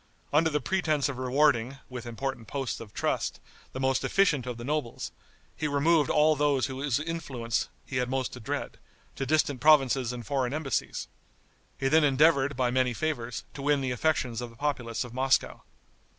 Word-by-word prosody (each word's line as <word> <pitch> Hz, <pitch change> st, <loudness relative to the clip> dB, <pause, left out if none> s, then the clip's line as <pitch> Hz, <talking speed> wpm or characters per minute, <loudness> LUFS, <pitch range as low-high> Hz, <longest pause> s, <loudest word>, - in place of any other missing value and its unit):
Under 160 Hz, +2 st, +4 dB
the 150 Hz, -1 st, 0 dB
pretense 155 Hz, -2 st, 0 dB
of 130 Hz, -2 st, -5 dB
rewarding, 130 Hz, -1 st, +2 dB
with 125 Hz, -2 st, -7 dB
important 120 Hz, -1 st, -4 dB
posts 135 Hz, -3 st, -3 dB
of 110 Hz, -3 st, -10 dB
trust, -, -, -1 dB, 0.3 s
the 130 Hz, -, -6 dB
most 130 Hz, 0 st, +1 dB
efficient 150 Hz, -10 st, +2 dB
of 125 Hz, -2 st, -4 dB
the 120 Hz, -, -7 dB
nobles, 145 Hz, -2 st, -3 dB, 0.4 s
he 155 Hz, -, -2 dB
removed 145 Hz, +1 st, +3 dB
all 155 Hz, +1 st, +4 dB
those 145 Hz, -4 st, +2 dB
whose 135 Hz, +1 st, -1 dB
influence 140 Hz, -8 st, -2 dB, 0.2 s
he 135 Hz, -, -4 dB
had 125 Hz, 0 st, 0 dB
most 130 Hz, -1 st, -1 dB
to 125 Hz, -, -8 dB
dread, 110 Hz, -, -4 dB, 0.4 s
to 135 Hz, -, -3 dB
distant 145 Hz, -3 st, +1 dB
provinces 135 Hz, -5 st, +4 dB
and 120 Hz, -2 st, -7 dB
foreign 135 Hz, -2 st, -1 dB
embassies. 155 Hz, -4 st, -2 dB, 0.7 s
He 135 Hz, -, 0 dB
then 155 Hz, +3 st, +5 dB
endeavored, 140 Hz, -1 st, +4 dB
by 125 Hz, -2 st, +1 dB
many 125 Hz, -1 st, +1 dB
favors, 125 Hz, -7 st, -3 dB
to 140 Hz, -, -7 dB
win 145 Hz, 0 st, +2 dB
the 130 Hz, -1 st, -1 dB
affections 125 Hz, -3 st, 0 dB
of 120 Hz, -, -5 dB
the 115 Hz, -, -16 dB
populace 120 Hz, -4 st, -2 dB
of 120 Hz, -2 st, -10 dB
Moscow. 130 Hz, +1 st, +1 dB
135 Hz, 180 wpm, -28 LUFS, 125-150 Hz, 0.7 s, then